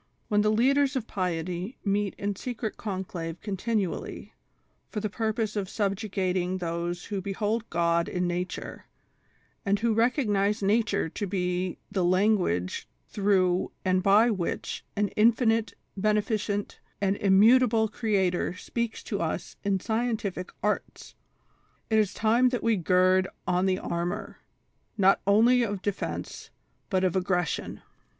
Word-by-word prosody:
When 210 Hz, 0 st, +3 dB
the 215 Hz, -, +2 dB
leaders 275 Hz, +5 st, +3 dB
of 250 Hz, -4 st, -1 dB
piety 180 Hz, +1 st, -3 dB
meet 200 Hz, 0 st, 0 dB
in 200 Hz, 0 st, -2 dB
secret 235 Hz, 0 st, -4 dB
conclave 180 Hz, -5 st, -5 dB
continually, 205 Hz, -1 st, -3 dB, 0.6 s
for 215 Hz, -, -3 dB
the 210 Hz, -1 st, -3 dB
purpose 220 Hz, 0 st, -1 dB
of 195 Hz, -3 st, -2 dB
subjugating 190 Hz, -3 st, -1 dB
those 175 Hz, 0 st, -3 dB
who 200 Hz, -2 st, -3 dB
behold 210 Hz, +4 st, -2 dB
God 170 Hz, 0 st, +1 dB
in 180 Hz, 0 st, -1 dB
Nature, 175 Hz, +1 st, -4 dB, 0.8 s
and 200 Hz, 0 st, +2 dB
who 230 Hz, +1 st, +1 dB
recognize 210 Hz, -3 st, +1 dB
Nature 210 Hz, -2 st, +2 dB
to 205 Hz, -, -4 dB
be 180 Hz, -1 st, -1 dB
the 195 Hz, -3 st, 0 dB
language 180 Hz, -, +1 dB, 0.2 s
through 190 Hz, -3 st, +2 dB
and 185 Hz, 0 st, +2 dB
by 210 Hz, +5 st, +5 dB
which 190 Hz, -5 st, -3 dB
an 205 Hz, 0 st, +1 dB
Infinite, 225 Hz, 0 st, +2 dB, 0.2 s
Beneficent 210 Hz, 0 st, -1 dB, 0.2 s
and 200 Hz, 0 st, +1 dB
Immu 205 Hz, +6 st, +6 dB
table 225 Hz, -3 st, +2 dB
Creator 195 Hz, -5 st, 0 dB
speaks 235 Hz, +2 st, -3 dB
to -, -, -3 dB
us -, -, -3 dB
in 200 Hz, -2 st, +1 dB
scientific 220 Hz, -4 st, -2 dB
'arts,' 210 Hz, -, -2 dB, 0.8 s
it 220 Hz, -, +5 dB
is 205 Hz, -3 st, +2 dB
time 235 Hz, +3 st, +3 dB
that 245 Hz, -1 st, -3 dB
we 230 Hz, -1 st, +3 dB
gird 185 Hz, +1 st, +3 dB, 0.2 s
on 180 Hz, +1 st, +1 dB
the 185 Hz, -1 st, +2 dB
armor, 170 Hz, 0 st, -4 dB, 0.6 s
not 195 Hz, -1 st, +4 dB
only 235 Hz, +5 st, +5 dB
of 205 Hz, -4 st, -2 dB
defence, 205 Hz, -1 st, -4 dB, 0.4 s
but 190 Hz, -2 st, +1 dB
of 185 Hz, -1 st, +1 dB
ag 185 Hz, -1 st, +1 dB
gression. 180 Hz, -4 st, -1 dB
200 Hz, 135 wpm, -27 LUFS, 185-220 Hz, 0.8 s, Immu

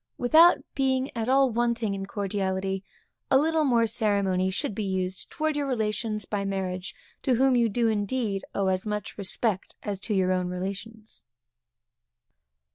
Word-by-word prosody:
Without 320 Hz, +8 st, +6 dB, 0.2 s
being 265 Hz, -1 st, 0 dB
at 230 Hz, +1 st, -2 dB
all 270 Hz, -1 st, +4 dB
wanting 235 Hz, -2 st, 0 dB
in 195 Hz, 0 st, -5 dB
cordiality, 195 Hz, -1 st, -2 dB, 0.5 s
a 265 Hz, -, +6 dB
little 315 Hz, +2 st, +2 dB
more 240 Hz, -5 st, +3 dB
ceremony 200 Hz, -4 st, +1 dB
should 190 Hz, +2 st, -2 dB
be 215 Hz, -, -3 dB
used 190 Hz, -1 st, -2 dB
towards 310 Hz, -2 st, -1 dB
your 290 Hz, -1 st, -1 dB
relations 215 Hz, -3 st, -1 dB
by 205 Hz, 0 st, -2 dB
marriage, 190 Hz, -1 st, -3 dB, 0.3 s
to 260 Hz, -3 st, +2 dB
whom 265 Hz, +1 st, +3 dB
you 235 Hz, -1 st, +4 dB, 0.2 s
indeed 210 Hz, -1 st, -1 dB
owe 200 Hz, -, +1 dB
as 185 Hz, +2 st, -1 dB
much 210 Hz, -1 st, -3 dB
respect 200 Hz, 0 st, -2 dB
as 205 Hz, -3 st, -3 dB
to 210 Hz, +1 st, -2 dB
your 185 Hz, -1 st, +2 dB
own 185 Hz, -1 st, 0 dB
relations. 200 Hz, +5 st, -6 dB
210 Hz, 150 wpm, -27 LUFS, 195-245 Hz, 0.5 s, Without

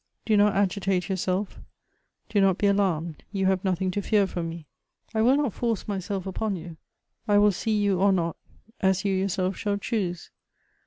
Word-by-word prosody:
Do 220 Hz, -, +3 dB
not 205 Hz, -1 st, +4 dB
agitate 195 Hz, -1 st, 0 dB
yourself; 190 Hz, +1 st, -2 dB, 0.7 s
do 205 Hz, -, +1 dB
not 190 Hz, -2 st, +3 dB
be -, -, 0 dB
alarmed; 175 Hz, -6 st, 0 dB
you 195 Hz, -2 st, -1 dB
have 190 Hz, -1 st, +1 dB
nothing 185 Hz, -1 st, 0 dB
to 205 Hz, -, -2 dB
fear 205 Hz, 0 st, +3 dB
from 175 Hz, -3 st, -4 dB
me. 165 Hz, -1 st, -8 dB, 0.5 s
I 220 Hz, -, +1 dB
will 255 Hz, +5 st, +5 dB
not 285 Hz, -8 st, 0 dB
force 230 Hz, -4 st, -2 dB
myself 195 Hz, -1 st, -3 dB
upon 195 Hz, +2 st, -2 dB
you. 170 Hz, -2 st, -8 dB, 0.5 s
I 205 Hz, -1 st, +4 dB
will 205 Hz, 0 st, +5 dB
see 215 Hz, +3 st, -1 dB
you 200 Hz, -3 st, +1 dB
or 200 Hz, +1 st, +4 dB
not, 170 Hz, -3 st, 0 dB, 0.4 s
as 190 Hz, 0 st, +1 dB
yon 195 Hz, -, +2 dB
yourself 190 Hz, 0 st, -1 dB
shall 205 Hz, -1 st, -1 dB
choose. 195 Hz, -6 st, -3 dB
195 Hz, 180 wpm, -26 LUFS, 185-205 Hz, 0.7 s, will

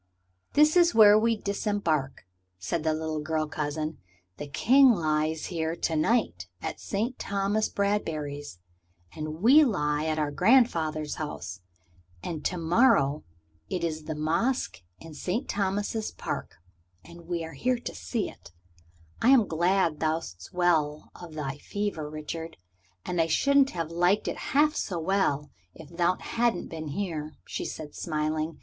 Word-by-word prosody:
"This 300 Hz, +2 st, +5 dB
is 345 Hz, -4 st, +5 dB
where 210 Hz, -2 st, +8 dB
we 230 Hz, 0 st, +2 dB
disembark," 200 Hz, -, -1 dB, 0.3 s
said 130 Hz, -, -3 dB
the 160 Hz, -1 st, +1 dB
little 160 Hz, 0 st, -3 dB
girl 155 Hz, +1 st, -1 dB
cousin. 155 Hz, +1 st, -3 dB, 0.4 s
"The 145 Hz, -, -6 dB
King 255 Hz, -, +5 dB
lies 155 Hz, -3 st, 0 dB
here 160 Hz, 0 st, -1 dB
to 165 Hz, -1 st, -1 dB
night 155 Hz, -, +1 dB
at -, -, -5 dB
Sir 210 Hz, +4 st, -1 dB
Thomas 200 Hz, +2 st, 0 dB
Bradbury's. 155 Hz, -, -2 dB, 0.6 s
And 155 Hz, +3 st, -6 dB
we 280 Hz, +7 st, +8 dB
lie 150 Hz, -, 0 dB
at 155 Hz, -1 st, 0 dB
our 150 Hz, -1 st, 0 dB
grandfather's 160 Hz, -, +2 dB
house. 100 Hz, -, -6 dB, 0.6 s
And 160 Hz, -3 st, -5 dB
to 180 Hz, -, 0 dB
morrow 160 Hz, -, +3 dB, 0.5 s
it 180 Hz, -, -2 dB
is 155 Hz, -2 st, -3 dB
the 155 Hz, -, -4 dB
Masque 155 Hz, -, -1 dB, 0.2 s
in 165 Hz, -1 st, -11 dB
Sir 180 Hz, +9 st, -2 dB
Thomas's 205 Hz, +2 st, -1 dB
Park. -, -, -5 dB, 0.5 s
And 170 Hz, 0 st, -13 dB
we 170 Hz, -1 st, -2 dB
are 160 Hz, -, -9 dB
to 245 Hz, -, -1 dB
see 230 Hz, -4 st, -3 dB
it. -, -, -13 dB, 0.7 s
I 240 Hz, -, +4 dB
am 260 Hz, -5 st, +6 dB
glad 170 Hz, -1 st, +1 dB
thou'st 155 Hz, -, -3 dB
well 160 Hz, -4 st, +1 dB
of 170 Hz, -3 st, -11 dB
thy 145 Hz, -1 st, -4 dB
fever, 200 Hz, -7 st, -3 dB
Richard. 155 Hz, +2 st, -6 dB, 0.5 s
I 170 Hz, -2 st, +1 dB
shouldn't 275 Hz, -, +4 dB
have 165 Hz, -2 st, -4 dB
liked 175 Hz, +4 st, +2 dB
it -, -, -2 dB, 0.2 s
half 300 Hz, +1 st, +4 dB
so 180 Hz, -, -2 dB
well 160 Hz, -5 st, 0 dB, 0.2 s
if 160 Hz, +1 st, -13 dB
thou 175 Hz, +1 st, +2 dB
hadn't 230 Hz, -4 st, -1 dB
been 160 Hz, -1 st, -6 dB
here," 155 Hz, -2 st, -4 dB
she -, -, -4 dB
said, 150 Hz, -2 st, -7 dB
smiling. 155 Hz, 0 st, -2 dB
165 Hz, 145 wpm, -27 LUFS, 155-205 Hz, 0.7 s, where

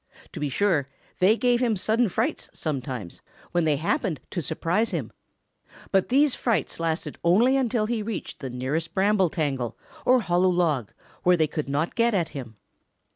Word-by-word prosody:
To -, -, -6 dB
be 150 Hz, -, -1 dB
sure, 160 Hz, -3 st, +1 dB, 0.3 s
they 200 Hz, +5 st, +5 dB
gave 245 Hz, 0 st, +2 dB
him 240 Hz, -3 st, +2 dB
sudden 220 Hz, +4 st, +1 dB
frights -, -, -2 dB
sometimes, 130 Hz, -, -4 dB, 0.3 s
when 175 Hz, -2 st, +1 dB
they 155 Hz, -2 st, +3 dB
happened 180 Hz, -, -1 dB
to 175 Hz, -, -2 dB
surprise 170 Hz, +8 st, 0 dB
him, -, -, -3 dB, 0.8 s
but 195 Hz, -2 st, +2 dB
these 280 Hz, +2 st, +4 dB
frights 230 Hz, -7 st, -1 dB
lasted 165 Hz, 0 st, -2 dB
only 220 Hz, +10 st, +4 dB
until 240 Hz, -4 st, +1 dB
he 225 Hz, 0 st, -1 dB
reached 210 Hz, -2 st, -5 dB
the 135 Hz, -, -5 dB
nearest 135 Hz, +7 st, -3 dB
bramble 195 Hz, -2 st, +3 dB
tangle 140 Hz, -, -2 dB, 0.3 s
or 255 Hz, 0 st, +4 dB
hollow 180 Hz, -1 st, +2 dB
log 160 Hz, -, +1 dB, 0.3 s
where 180 Hz, 0 st, +4 dB
they 160 Hz, -, +3 dB
could 150 Hz, -1 st, -4 dB
not 150 Hz, +4 st, 0 dB
get 235 Hz, -1 st, +2 dB
at 170 Hz, -4 st, 0 dB
him. 120 Hz, -6 st, -8 dB
175 Hz, 170 wpm, -25 LUFS, 150-220 Hz, 0.8 s, they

